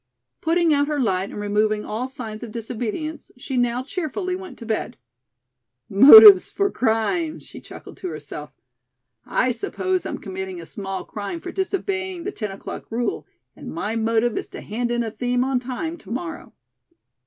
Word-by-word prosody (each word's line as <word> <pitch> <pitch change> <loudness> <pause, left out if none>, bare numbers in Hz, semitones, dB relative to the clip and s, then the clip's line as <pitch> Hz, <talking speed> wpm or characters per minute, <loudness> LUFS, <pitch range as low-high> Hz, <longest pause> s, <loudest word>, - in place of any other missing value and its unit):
Putting 330 0 +3
out 285 0 +2
her 300 -1 -1
light 195 -6 0
and - - -7
removing 210 +1 0
all 230 +4 -3
signs 230 -5 -7
of 235 -3 -7
disobedience, 240 +7 -5
she 260 +1 -5
now 245 0 +1
cheerfully 365 +3 -3
went 375 0 -9
to 230 - -10
bed. 220 -1 -3 0.9
"Motives 380 - +10
for 400 -1 0
crime," 260 +8 0
she - - -12
chuckled - - -12
to - - -5
herself. 150 -2 -7 0.8
"I 255 - +1
suppose 370 - -2
I'm - - -4
committing 190 -2 -6
a 165 - -9
small 195 +2 -5
crime 210 - -5
for 355 +2 -7
disobeying 380 -2 -2
the 405 - -3
ten 215 - -4
o'clock 195 +3 -8
rule, 240 +1 -2 0.3
and - - -9
my 215 +2 -3
motive 225 +1 +1
is - - -8
to - - -9
hand 235 +3 -3
in 240 0 0
a 225 - -4
theme 245 +2 0
on 265 -1 +1
time 265 +7 -5
to - - -15
morrow." 325 +8 -5
245 Hz, 170 wpm, -23 LUFS, 215-330 Hz, 0.9 s, Motives